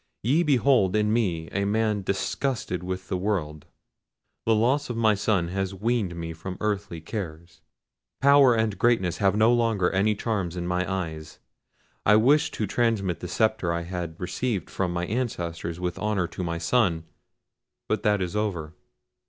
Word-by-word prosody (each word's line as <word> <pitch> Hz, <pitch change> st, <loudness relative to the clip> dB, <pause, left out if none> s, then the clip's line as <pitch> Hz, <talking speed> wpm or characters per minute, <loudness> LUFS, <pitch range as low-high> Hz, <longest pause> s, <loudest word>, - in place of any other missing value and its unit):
Ye 140 Hz, +10 st, +3 dB
behold 130 Hz, -, +3 dB
in 105 Hz, 0 st, +2 dB
me 90 Hz, -9 st, 0 dB
a 100 Hz, -, -1 dB
man 105 Hz, 0 st, +1 dB
disgusted 100 Hz, -, -2 dB
with 90 Hz, +1 st, -5 dB
the 95 Hz, -, -1 dB
world: 85 Hz, -7 st, -2 dB, 0.8 s
the 115 Hz, -, +4 dB
loss 130 Hz, +7 st, +1 dB
of 120 Hz, -, -3 dB
my 110 Hz, -2 st, +4 dB
son 100 Hz, -4 st, 0 dB
has 95 Hz, +1 st, -2 dB
weaned 105 Hz, -3 st, -1 dB
me 80 Hz, -1 st, -5 dB
from 90 Hz, +3 st, -7 dB
earthly 100 Hz, -5 st, -2 dB
cares. 80 Hz, -3 st, -7 dB, 0.6 s
Power 140 Hz, -3 st, +6 dB
and 110 Hz, -2 st, 0 dB
greatness 115 Hz, -8 st, +2 dB
have 100 Hz, -1 st, +2 dB
no 110 Hz, +3 st, +4 dB
longer 115 Hz, -6 st, +2 dB
any 100 Hz, +3 st, +2 dB
charms 100 Hz, -5 st, -2 dB
in 85 Hz, -, -3 dB
my 90 Hz, +1 st, -1 dB
eyes. 80 Hz, -5 st, -4 dB, 0.7 s
I 105 Hz, -, +5 dB
wished 135 Hz, +8 st, +3 dB
to 110 Hz, -, -1 dB
transmit 100 Hz, -5 st, 0 dB
the 90 Hz, -, -6 dB
sceptre 110 Hz, -4 st, +1 dB
I 85 Hz, 0 st, -2 dB
had 85 Hz, -2 st, -5 dB
received 100 Hz, +3 st, -2 dB
from 95 Hz, -2 st, -1 dB
my 85 Hz, 0 st, -2 dB
ancestors 85 Hz, -7 st, -3 dB
with 90 Hz, -1 st, -3 dB
honour 105 Hz, -4 st, 0 dB
to 90 Hz, -, -5 dB
my 85 Hz, -1 st, -2 dB
son—but 85 Hz, -3 st, -3 dB
that 105 Hz, -2 st, +2 dB
is 90 Hz, +3 st, -5 dB
over! 90 Hz, -8 st, -2 dB
100 Hz, 160 wpm, -26 LUFS, 85-110 Hz, 0.8 s, Power